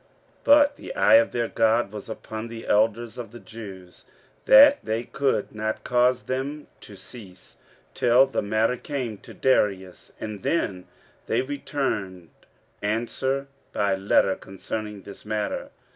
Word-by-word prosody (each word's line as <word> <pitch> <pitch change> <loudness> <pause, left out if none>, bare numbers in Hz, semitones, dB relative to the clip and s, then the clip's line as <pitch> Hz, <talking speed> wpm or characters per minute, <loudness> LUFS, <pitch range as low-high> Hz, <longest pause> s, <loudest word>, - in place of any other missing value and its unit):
15:005:005 - - -35 0.4
But 285 0 +6
the - - -8
eye - - +5
of 285 - +2
their 120 -1 -1
God 115 -2 +1
was 105 0 -9
upon 110 0 -6
the 115 0 -9
elders 115 +3 +1
of 115 -4 -7
the 120 - -11
Jews, 95 -6 -11 0.4
that 280 +2 +8
they 110 +2 -2
could 135 -4 -1
not 110 0 -3
cause 125 0 +2
them 140 +3 -4
to 105 - -13
cease, 95 -1 -13 0.4
till 125 +2 +5
the 135 - -2
matter 110 +4 +1
came 125 -7 -5
to - - -14
Darius: 95 -8 0
and 105 -3 -6
then 95 - -1 0.4
they - - +1
returned 110 - -4 0.5
answer 120 +6 -1 0.3
by 100 -1 +1
letter 95 0 +2
concerning 105 +2 -7
this 100 - -11
matter. 105 -1 -3
115 Hz, 145 wpm, -25 LUFS, 105-130 Hz, 0.5 s, that